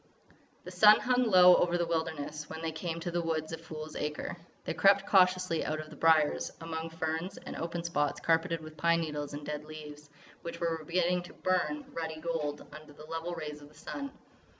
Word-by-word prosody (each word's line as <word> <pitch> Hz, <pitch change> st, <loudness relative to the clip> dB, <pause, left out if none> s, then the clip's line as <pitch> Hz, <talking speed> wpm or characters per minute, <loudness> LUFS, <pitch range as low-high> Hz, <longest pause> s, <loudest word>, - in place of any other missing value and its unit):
The 180 Hz, -, -8 dB
sun 210 Hz, +4 st, +7 dB
hung 250 Hz, 0 st, +2 dB
low 180 Hz, -4 st, +8 dB
over 175 Hz, 0 st, +2 dB
the 175 Hz, -, +1 dB
wilderness 160 Hz, -2 st, -3 dB
when 160 Hz, +1 st, -7 dB
they 165 Hz, -, -1 dB
came 165 Hz, +1 st, -4 dB
to 175 Hz, -, -3 dB
the 175 Hz, 0 st, 0 dB
woods 160 Hz, -1 st, -2 dB
of 165 Hz, -, -6 dB
Fool's 155 Hz, -1 st, -8 dB
Acre. 150 Hz, +2 st, -3 dB, 0.3 s
They -, -, -1 dB
crept 195 Hz, 0 st, +5 dB
cautiously 185 Hz, -3 st, +3 dB
out 155 Hz, +1 st, -2 dB
of 155 Hz, 0 st, -8 dB
the -, -, -10 dB
briers, 155 Hz, -1 st, +3 dB
among 165 Hz, 0 st, -4 dB
ferns 165 Hz, +3 st, -3 dB
and -, -, -8 dB
open 170 Hz, +1 st, -3 dB
spots 145 Hz, -4 st, 0 dB
carpeted 165 Hz, 0 st, +1 dB
with 155 Hz, 0 st, -11 dB
pine 170 Hz, +2 st, +3 dB
needles 150 Hz, -2 st, -4 dB
and 145 Hz, 0 st, -7 dB
dead 150 Hz, 0 st, -4 dB
leaves 150 Hz, -1 st, -10 dB, 0.3 s
which 170 Hz, -, -6 dB
were 165 Hz, -2 st, -1 dB
beginning 180 Hz, +2 st, +1 dB
to 175 Hz, -, -12 dB
burn 185 Hz, +11 st, 0 dB
ruddy 160 Hz, -1 st, -4 dB
gold 155 Hz, -3 st, -3 dB
under 155 Hz, -1 st, -11 dB
the 150 Hz, -, -12 dB
level 165 Hz, +2 st, -4 dB
rays 150 Hz, -2 st, -6 dB
of 145 Hz, -, -12 dB
the 150 Hz, -, -21 dB
sun. 280 Hz, -1 st, -6 dB
165 Hz, 200 wpm, -31 LUFS, 155-175 Hz, 0.3 s, low